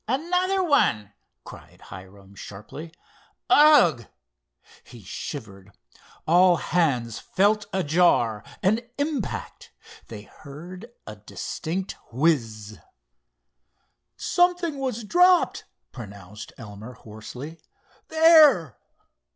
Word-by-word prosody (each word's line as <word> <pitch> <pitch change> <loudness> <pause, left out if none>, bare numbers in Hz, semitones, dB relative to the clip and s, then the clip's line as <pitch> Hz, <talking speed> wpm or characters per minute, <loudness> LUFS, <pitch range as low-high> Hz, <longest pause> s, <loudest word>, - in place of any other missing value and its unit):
"Another 360 - 0
one," 105 - +1 0.3
cried - - -14
Hiram 95 +2 -14
sharply—"ugh!" 160 - 0 0.8
He 120 -4 -15
shivered. 100 - -9 0.5
All 175 +2 +5
hands 135 -11 -1
felt 205 +2 0
a 190 -1 -1
jar, 145 - +2 0.2
an 210 +4 +2 0.2
impact. 285 -6 -4 0.4
They 105 -2 -10
heard 175 - -12
a 105 - -9
distinct 170 - -6
whiz. 115 - -1 1.4
"Something 355 -4 0
was 250 -4 -3
dropped!" 360 - +3 0.3
pronounced 100 -3 -11
Elmer, 110 +1 -10
hoarsely. 125 +7 -11 0.5
"There!" 310 - +5
160 Hz, 80 wpm, -24 LUFS, -, 1.4 s, All